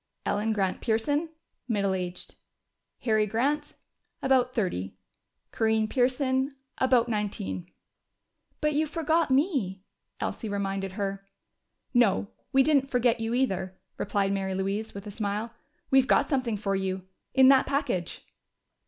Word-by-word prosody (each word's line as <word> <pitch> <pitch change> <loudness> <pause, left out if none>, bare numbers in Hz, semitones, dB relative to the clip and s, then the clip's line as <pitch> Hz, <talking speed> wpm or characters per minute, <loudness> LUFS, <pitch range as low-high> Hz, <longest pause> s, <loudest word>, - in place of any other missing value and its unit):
"Ellen 210 +2 0
Grant 195 -3 0
Pearson 285 +8 0 0.4
middle 200 -4 +1
aged. 180 -1 -5 0.7
"Harry 215 -2 +2
Grant 285 +8 0 0.5
about 260 -2 +3
thirty. 180 - -2 0.6
"Corinne 220 -1 +2
Pearson 260 +3 +1 0.2
about 250 -2 +4
nineteen...." 200 - -3 0.9
"But 300 0 +2
you 310 +2 +1
forgot 320 +1 +1
me!" 260 - +1 0.4
Elsie 220 - -3
reminded 195 -1 -2
her. 195 -1 -3 0.7
"No, 215 -4 +3 0.2
we 270 -1 +5
didn't 280 -2 +3
forget 245 -2 +2
you, 225 +1 -1
either," 190 -7 -1 0.2
replied 200 -1 0
Mary 190 -1 -1
Louise, 200 +3 -2
with 200 +1 -7
a 205 - -6
smile. 210 +2 -3 0.4
"We've 265 -1 +5
got - - +3
something 255 -6 0
for 195 -1 -1
you 190 -1 -2 0.3
in 265 -1 +8
that 270 -1 +5
package." 265 - -2
220 Hz, 125 wpm, -28 LUFS, 195-265 Hz, 0.9 s, in